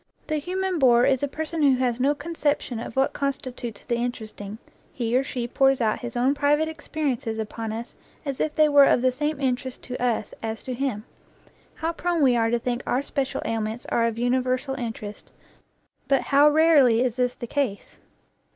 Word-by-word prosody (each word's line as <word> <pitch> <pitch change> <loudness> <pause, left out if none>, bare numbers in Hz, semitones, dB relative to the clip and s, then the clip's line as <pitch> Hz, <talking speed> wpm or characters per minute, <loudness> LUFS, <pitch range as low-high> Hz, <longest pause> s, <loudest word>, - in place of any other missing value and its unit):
The 310 - -1
human 370 +3 -2
bore 245 -3 +5
is 265 -2 +2
a 285 - +1
person 315 +3 -4
who 275 -3 +5
has 250 -2 0
no 280 +3 +2
conception 290 -5 -2
of 230 - -7
what 270 0 +2
consti 275 -3 -3
tutes 230 -5 -7
the 235 -1 0
interesting; 220 -4 -5 0.3
he 235 -1 -2
or 260 - +3
she 245 -3 -4
pours 270 +2 +3
out 220 -3 +1
his 240 0 -6
own 255 +3 +3
private 295 +2 +2
experiences 290 -7 -3
upon 220 0 -4
us 230 +2 -6 0.3
as 275 -2 -3
if 305 - -1
they 310 -1 +5
were 285 -1 +7
of 250 - +3
the 255 - +4
same 295 +3 -2
interest 260 -1 -2
to 250 0 -5
us 235 -3 -1
as 220 -1 -4
to 255 - -4
him. 245 -4 -2 0.7
How 330 +1 -2
prone 345 -2 0
we 255 -3 +5
are 225 -1 +2
to 240 - +2
think 240 +1 -2
our 260 +3 +1
special 275 -2 -2
ailments 225 +1 -3
are 230 0 +2
of 230 -1 -3
universal 255 +2 0
interest, 225 -5 -6 0.8
but 275 -2 +3
how 285 +1 +5
rarely 295 -7 +5
is 245 -3 -1
this 250 -1 +1
the - - -6
case 240 -5 -3
255 Hz, 195 wpm, -25 LUFS, 235-285 Hz, 0.8 s, were